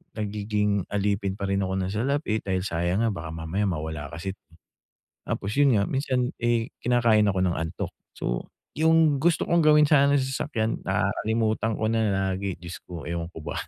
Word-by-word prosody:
nagiging 105 -2 -1
alipin 100 -1 0
parin 100 -1 -1
ako 95 0 -2
ng 95 0 -2
salapi, 125 -1 0
dahil 95 -1 -1
sayang 85 +3 0
nga 115 - +2
baka 85 -3 -6
mamaya 85 +6 -1
mawala 80 -4 -3
kasi't 95 +3 -5 0.9
tapos 100 - -2
'yon 140 -5 +5
nga 100 - +3
minsan, 130 -2 0
eh, 120 -1 +1
kinakain 115 -4 +3
ako 95 -2 +1
ng 90 -2 0
antok. 80 +1 -4 0.2
So, - - -3 0.3
'yung 160 -2 +4
gusto 170 +1 +2
kong 170 0 +3
gawin 150 0 +6
sana 140 -1 +5
sa 135 - +1
sasakyan 130 -4 -2
nakakalimutan 110 0 0
ko - - -2
na 115 - +2 0.3
lagi 95 -1 -3
Diyos 85 +1 -8
ko, 85 -4 -8
ewan 85 -1 -3
ko 80 - -9
ba? - - -3
105 Hz, 170 wpm, -26 LUFS, 95-125 Hz, 0.9 s, gawin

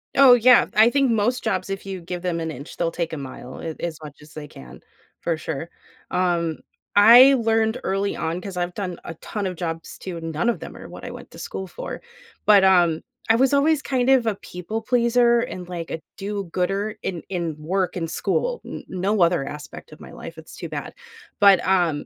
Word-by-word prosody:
Oh 275 -2 +8
yeah, 245 0 +6
I 220 +2 +7
think 275 -2 +2
most 230 +3 +1
jobs 185 +1 -1
if 195 0 -5
you 190 -1 -4
give 175 +1 -6
them 175 -2 -2
an 160 -1 -3
inch, 140 +1 -10
they'll 165 -1 0
take 165 -1 -3
a 160 - -3
mile, 130 -1 -8
a 160 -1 -5
as 165 -3 -3
much 150 0 -11
as 150 +1 -16
they 150 -1 -8
can, 65 - -13 0.4
for 165 -2 -1
sure. 160 +1 -5 0.4
Um, 170 -3 0 0.4
I 240 +6 +9
learned 225 -2 +1
early 195 +1 -1
on 165 +2 -2
'cause 190 -1 -7
I've 175 0 -3
done 185 -4 -4
a 165 - -6
ton 200 +4 -4
of 180 - -4
jobs 165 -1 -5
too, 180 -3 -6
and 165 0 -5
none 170 +10 0
of - - -1
them - - -9
are - - -10
what - - -11
I - - -5
went - - -11
to - - -12
school 190 - -5
for. 180 - -7 0.4
But, 205 -2 +7
um, 175 -4 +4 0.3
I 225 - +6
was 265 +3 +3
always 295 +1 +3
kind 260 -2 0
of 255 -3 +4
a 215 - +1
people 195 +5 -6
pleaser, 235 0 +3
and, 180 -6 -5
like, 170 -2 -6
a 160 - -5 0.2
do-gooder 200 +1 -2
in 175 -3 -4
in 170 -4 -2
work 180 +5 -1
and 165 -3 -3
school. - - -1
N - - -7
no 190 +2 -1
other 170 -4 +3
aspect 150 0 -9
of - - -13
my - - -12
life, - - -10
it's - - -12
too - - -7
bad. - - -6 0.5
But, 200 -3 +6
um, 175 -6 +1
185 Hz, 215 wpm, -23 LUFS, 165-220 Hz, 0.5 s, I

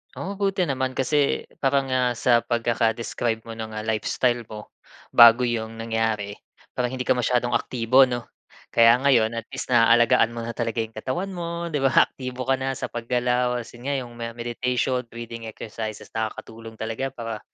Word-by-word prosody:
Oh, 200 +1 -5
buti 195 -2 0
naman 130 -2 -1
kasi, 140 +2 0 0.2
parang, 135 0 +2
ah, 130 -1 +1
sa 120 -2 +3
pagkaka-describe 115 -1 -1
mo 115 - -7
ng, 110 0 -6
ah, 110 - -5
lifestyle 110 +3 0
mo, 105 -1 -10 0.5
bago 120 +1 +8
'yong 115 -1 -3
nangyari. 110 -3 -1 0.4
Parang 125 -1 -1
hindi 130 -1 -4
ka - - +4
masyadong 120 0 +1
aktibo, 125 +2 +3
'no? 120 -2 -2 0.5
Kaya 115 +1 +7
ngayon, 120 -5 +3
at 115 -1 -5
least 130 - -5
naalagaan 115 0 +4
mo 115 - -4
na 115 - -4
talaga 115 -1 -2
'yong 110 - -9
katawan 135 - -4
mo, 170 -1 -4
'di 150 - 0
ba? 135 -1 +5
Aktibo 130 -1 -6
ka 135 +1 +1
na 135 0 -2
sa - - -5
pag-galaw, 125 +1 0
kasi 120 - -14
nga 140 +3 -2
'yong 125 -3 -4 0.2
meditation, 125 +2 -1
breathing 115 0 -8
exercises, 110 0 -7
nakakatulong 110 0 -6
talaga 115 +4 -3
para 115 -4 -6
120 Hz, 170 wpm, -24 LUFS, 115-130 Hz, 0.5 s, bago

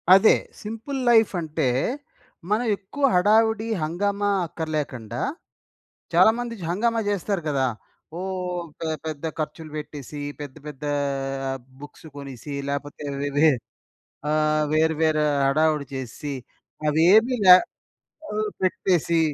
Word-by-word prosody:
అదే 195 +3 +6 0.3
simple 225 +6 -5
life 225 -2 +5
అంటే, 155 -4 -1 0.8
మనం 230 +3 +2
ఎక్కువ 205 +9 -8
హడావిడి, 220 +3 +3 0.2
హంగామా 200 +5 0 0.2
అక్కర్లేకండా 145 -8 -4 0.9
చాలామంది 230 +1 +4
హంగామా 230 +6 +1
చేస్తారు 200 -1 -1
కదా! 135 -3 +1 0.5
ఓ - - -4 0.6
పె 165 - -2 0.2
పెద్ద 155 -1 -4
ఖర్చులు 155 0 -5
పెట్టేసి, 150 -1 -7 0.2
పెద్ద, 145 -3 -7
పెద్దా 145 0 -4 0.9
బుక్స్ 145 +2 -12
కొనేసి, 140 0 -8 0.2
లేకపోతే 140 +1 -4 0.2
వే 145 - -1
వే 155 +2 +6 0.8
ఆహ్, 155 0 +2
వేరు 160 0 +3
వేరు 155 -1 +3 0.2
హడావిడి 155 +1 +2
చేసిసి, 130 +3 -5 0.6
అవేమీ 195 - +5
లే 180 - +12 0.8
ఓహ్! 215 0 -1
పెట్టేసి 175 -3 +2
160 Hz, 105 wpm, -24 LUFS, 150-205 Hz, 0.9 s, లే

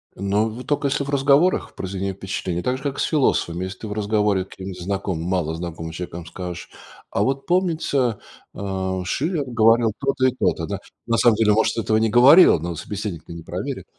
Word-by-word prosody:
Но 100 +3 0
в 120 +4 -8
тока 145 -1 0
если 140 0 -1
в - - -7
разговорах 140 +5 +3
произведение 95 0 -4
впечатления. 95 -2 -4
Так 125 0 0
же, 135 - -12
как 140 -1 -3
с - - +2
философами. 95 - +1
Если 95 +1 -6
ты 110 - -6
в 105 - -4
разговоре 105 -2 +1
с - - -18
каким-нибудь 95 -1 -8
знакомым, 95 -3 -3
малознакомым 85 -2 -3
человеком 85 -1 -6
скажешь: 90 +1 -7 0.4
"А - - +1
вот 135 +1 -1
помнится, 160 - +1 0.3
э, 95 -1 -3
Шиллер 155 - -1
говорил 115 -1 +3
то-то 135 -1 0
и - - +2
то-то", - - 0
да. - - -4 0.3
На 115 0 +2
самом 120 -3 +5
деле, 105 -1 +3
может, 110 +2 +1
этого 110 -1 +1
не 110 0 +2
говорил, 125 - +7
но 85 +1 -4
собеседник-то 100 -5 -6
не 85 -1 -8
проверит. - - -5
105 Hz, 190 wpm, -22 LUFS, 95-130 Hz, 0.4 s, говорил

